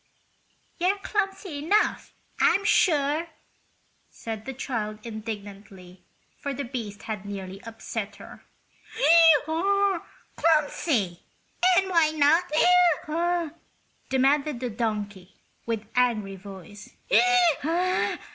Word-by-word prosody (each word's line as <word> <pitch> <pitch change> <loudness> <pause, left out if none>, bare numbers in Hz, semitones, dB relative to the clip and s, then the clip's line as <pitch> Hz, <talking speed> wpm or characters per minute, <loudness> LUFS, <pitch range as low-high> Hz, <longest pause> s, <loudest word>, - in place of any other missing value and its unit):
"You're 370 +4 +2
clumsy 390 -5 -3
enough, 405 +9 0 0.2
I'm 400 - +3
sure!" 310 -4 +2 0.8
said 220 -1 -7
the 265 - -5
child, 220 -5 -4
indignantly, 205 -4 -9 0.4
for 280 -1 -4
the 280 - -4
beast 230 -6 -6
had 215 -3 -5
nearly 195 -1 -7
upset 220 -2 -6
her. 200 - -13 1.0
"Clumsy! 320 - 0 0.6
And 380 0 +1
why 330 -3 +4
not?" 335 +1 +2 0.6
demanded 275 +1 +1
the 250 -1 -4
donkey, 205 -4 -4 0.3
with 225 -2 -2
angry 225 -6 +1
voice. 195 +1 -12
255 Hz, 85 wpm, -26 LUFS, 210-330 Hz, 1.0 s, why